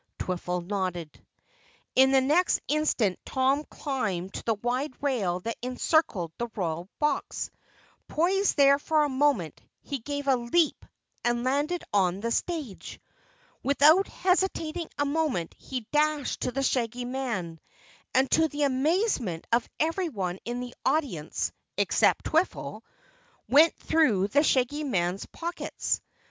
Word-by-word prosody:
Twiffle 180 0 -2
nodded. 180 -5 -4 0.7
In 265 +1 +6
the 270 -1 +5
next 310 +7 +3
instant 280 -10 +1
Tom 270 +2 +1
climbed 200 -10 -3
to - - -6
the 225 - +2
wide 250 +6 -2
rail 205 -11 0
that 230 +4 -4
encircled 250 - +1
the 240 - -1
Royal 175 -1 -3
Box. 300 -1 -1 0.6
Poised 375 +4 +1
there 280 0 +6
for 310 +1 +2
a 295 - 0
moment, 260 - +1 0.2
he 280 -2 -4
gave 285 +4 -5
a 270 - +5
leap 255 +7 +1 0.4
and 240 0 +1
landed 290 +7 0
on 190 -2 +2
the 230 +3 -2
stage. 300 - -3 0.6
Without 300 +7 +5
hesitating 360 -3 0
a 290 - +1
moment 285 - -1
he 260 -2 -5
dashed 300 -1 +1
to - - -1
the 275 +2 -2
Shaggy 245 -2 0
Man, 235 -11 -3 0.6
and 265 +1 +3
to 320 0 +4
the 295 -1 -2
amazement 275 - +1
of 235 0 +2
everyone 295 - -1
in 240 +1 -3
the 250 0 -7
audience 265 - -1 0.3
except - - +2
Twiffle, 325 +4 0 0.7
went 310 +4 +6
through 220 -12 +2
the 285 +7 +4
Shaggy 290 0 +1
Man's 185 -8 -1
pockets. 340 +1 -3
265 Hz, 130 wpm, -27 LUFS, 205-300 Hz, 0.7 s, In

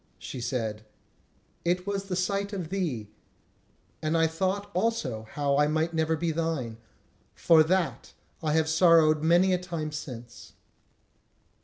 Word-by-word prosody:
She 125 - -7
said: 115 -3 -3 0.8
"It 180 +1 0
was 200 -1 -2
the 190 -2 -3
sight 200 +2 -1
of 180 -5 -4
thee; 145 - -3 0.9
and 155 +1 0
I 165 - +4
thought 190 +5 -2
also 155 - -1
how 140 -1 +1
I 150 0 +4
might 160 +2 0
never 160 0 +1
be 165 +1 -1
thine. 155 -8 -2 0.6
For 165 -2 +5
that 175 +2 0 0.3
I 155 -2 0
have 160 0 +2
sorrowed 160 -2 +5
many 175 +4 +4
a 180 - +1
time 170 -4 -4
since." 120 -6 -8
160 Hz, 140 wpm, -27 LUFS, 150-180 Hz, 0.9 s, For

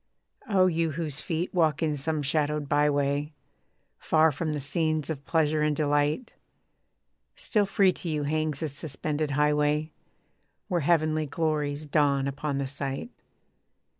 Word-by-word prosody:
Oh! 190 -3 +4
you 165 -3 +1
whose 150 -2 -4
feet 170 +2 -3
walk 160 -4 +2
in 155 -2 +1
some 150 +1 -2
shadowed 150 0 0
by 145 +1 +3
way, 145 +1 0 0.7
Far 160 0 +3
from 155 +2 -3
the 150 - -2
scenes 155 +2 0
of 140 -3 -6
pleasure 155 -2 +1
and 150 0 +2
delight, 145 - 0 1.0
Still 210 -3 0
free 195 -1 +3
to 175 - -6
you 150 -2 -1
hangs 155 -1 -1
this 155 -4 -3
suspended 150 +1 -3
highway, 150 +2 +1 0.8
Where 180 -4 0
heavenly 155 -1 +2
glories 150 -1 -1
dawn 140 -2 +2
upon 140 +1 -3
the 140 - -1
sight. 140 - -5
150 Hz, 140 wpm, -27 LUFS, 145-160 Hz, 1.0 s, Oh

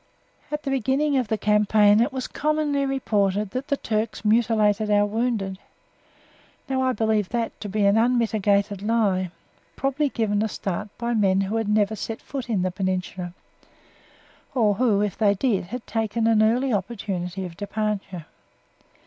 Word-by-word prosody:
At 300 0 -4
the 275 - -2
beginning 270 +3 +1
of 250 - -2
the 220 - 0
campaign 210 0 +4
it 250 +5 +1
was 260 -1 -4
commonly 295 -2 0
reported 205 -6 0
that 260 +3 -4
the 280 - 0
Turks 215 -2 -2
mutilated 215 -1 +2
our 205 0 +4
wounded. 210 -3 -2 1.1
Now 265 -1 0
I 260 0 +2
believe 220 -4 0
that 235 -1 -3
to 210 - -5
be 205 +1 +1
an 200 +2 +4
unmitigated 210 -4 +1
lie, 205 -4 +1 0.5
probably 275 +2 0
given 210 -4 0
a 220 - +1
start 195 -1 -4
by 235 0 -2
men 195 -3 +3
who 200 +3 -1
had 225 -2 -1
never 210 0 +2
set 220 +2 -5
foot 265 -3 -6
in 200 -6 +1
the 185 - 0
Peninsula 185 -1 -3 1.2
or 215 -5 +3
who, 210 -2 +2
if 205 -3 -1
they 205 -2 +3
did, 205 -3 0
had 235 +6 -7
taken 225 0 -1
an 225 -1 +4
early 240 +4 +2
opportunity 190 -3 -3
of 170 -2 -8
departure. 205 -4 -3
215 Hz, 160 wpm, -24 LUFS, 200-240 Hz, 1.2 s, campaign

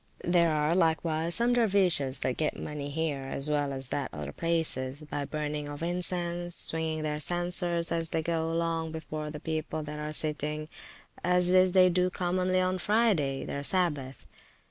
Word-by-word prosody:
There 170 -1 +3
are 150 +1 +1
likewise 165 -1 +3
some 240 +1 +3
dervises 190 - +3
that 125 - -1
get 155 - -1
money 145 -1 -5
here, 150 -2 -2
as 140 +2 -2
well 145 -1 0
as 135 -1 -5
at 140 -2 -2
other 75 -1 -6
places, 155 - -1
by 145 -1 -4
burning 150 0 -4
of 145 +2 -7
incense, 175 0 -1
swinging 160 -1 +2
their 150 -1 -2
censers 175 +1 -1
as 165 -1 -1
they 160 - -1
go 165 0 -1
along 165 -1 -1
before 155 -1 -5
the 150 0 -7
people 155 0 -3
that 150 0 -7
are 150 0 -4
sitting; 150 0 -1 0.5
as 180 0 +4
this 185 0 +4
they 185 -1 +6
do 180 +1 +2
commonly 185 +1 0
on 185 0 0
Friday, 195 -11 +1
their 140 - -4
Sabbath. 145 -5 -1
160 Hz, 165 wpm, -29 LUFS, 150-175 Hz, 0.5 s, they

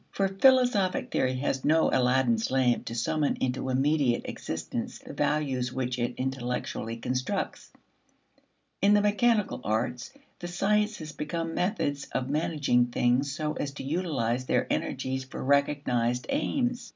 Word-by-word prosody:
For 195 - 0
philosophic 240 -1 +3
theory 130 0 +1
has 135 0 -1
no 160 +1 +3
Aladdin's 125 -3 +2
lamp 130 -2 +2
to 115 - -5
summon 145 +5 0
into 130 +1 -2
immediate 135 -1 +2
existence 80 0 -5
the - - -11
values 135 -5 0
which 125 -1 -2
it 120 +1 -1
intellectually 125 -3 -3
constructs. 130 - -3 1.1
In 205 +1 +5
the 205 - +4
mechanical 210 - +2
arts, 120 - -1 0.3
the 175 - -5
sciences 200 -2 0
become 165 +2 -4
methods 145 -7 -1
of 130 +1 -1
managing 145 -5 +2
things 125 +3 +1
so 150 +2 -2
as 140 -2 -4
to 145 - -7
utilize 135 -6 -1
their - - +2
energies 130 0 -2
for 130 - -7
recognized 130 -3 +1
aims. 255 -3 -1
140 Hz, 135 wpm, -28 LUFS, 125-175 Hz, 1.1 s, In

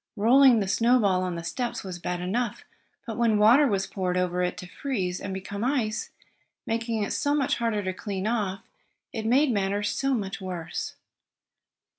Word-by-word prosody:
Rolling 240 +2 +6
the 195 - -1
snowball 215 -3 +3
on 180 -1 -2
the 170 - -5
steps 240 +7 -3
was 185 -2 -6
bad 175 0 -3
enough, 215 +5 -2 0.4
but 225 -2 -5
when 230 -3 +3
water 240 +8 +6
was 195 -4 0
poured 185 -2 -2
over 180 0 0
it, 180 0 -1
to - - -7
freeze, 185 -3 -3
and 200 - -4
become 195 +2 -5
ice, 245 -5 -1 0.6
making 225 -1 -1
it - - -2
so 290 0 +1
much 280 -3 +1
harder 230 -3 -1
to 185 0 -2
clean 195 0 -4
off, 210 -4 -1 0.5
it 220 -1 -3
made 265 +4 +4
matters 205 0 0
so 270 -1 0
much 200 -2 -4
worse. 180 -3 -5
210 Hz, 175 wpm, -26 LUFS, 185-235 Hz, 0.6 s, Rolling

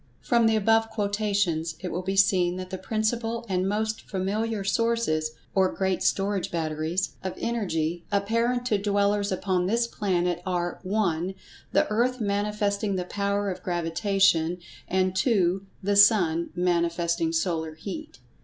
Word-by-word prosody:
From 235 -4 +3
the 220 - +3
above 225 +1 +3
quotations, 200 -6 0
it 180 - -5
will 180 - -2
be 190 +1 -2
seen 185 -2 +3
that 185 0 -7
the 190 - -4
principal 225 +1 -1
and 185 -1 0
most 215 +1 -1
familiar 205 +2 -1
sources 195 -7 0 0.2
(or 190 -1 +3
great 190 -1 -1
storage 195 -2 0
batteries) 160 +2 -2
of 190 - -4
Energy, 175 -8 -2
apparent 230 +5 +1
to 215 -5 +1
dwellers 200 0 +1
upon 185 -1 0
this 235 +4 +2
planet, 180 -6 -1
are 175 -1 -2
(1) 185 -2 -1 0.4
the - - +3
Earth 250 +4 +1
manifesting 205 -1 0
the 180 -1 -2
Power 200 +1 -1
of 185 0 -7
Gravitation; 175 0 +1 0.3
and 185 0 +1
(2) 195 -3 +1 0.2
the 200 +1 +1
Sun, 180 -6 +5
manifesting 170 -2 +1
solar 160 -1 -1
heat. 210 - -7
195 Hz, 140 wpm, -26 LUFS, 175-215 Hz, 0.4 s, Sun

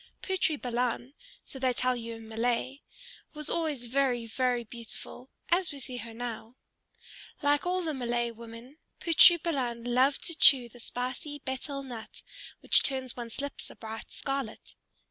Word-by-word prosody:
Putri 365 -6 +1
Balan, 245 +1 -1 0.3
so 265 - -9
they 255 -1 +2
tell 255 +1 +2
you 230 -1 -5
in 225 0 -11
Malay, 240 +4 -1 0.6
was 300 -1 -3
always 305 -7 0
very, 250 -1 +1
very 245 +1 0
beautiful, 235 +2 -9 0.2
as 350 +1 +2
we 285 - -7
see 255 -1 -5
her 230 -1 -6
now. 225 0 -6 0.9
Like 290 +3 +3
all 365 0 +1
the 315 -2 -1
Malay 240 -2 0
women, 230 +5 -11 0.2
Putri 345 0 +8
Balan 260 -9 -2
loved 255 +3 +3
to 335 - +3
chew 265 -6 +7
the 245 - -15
spicy 255 +5 -4
betel 275 +2 -3
nut 240 -4 -9 0.4
which - - +5
turns 260 -3 -1
one's 235 +1 -5
lips 285 0 -5
a - - -12
bright 225 0 -8
scarlet. 270 -5 -4
250 Hz, 155 wpm, -30 LUFS, 235-280 Hz, 0.9 s, Putri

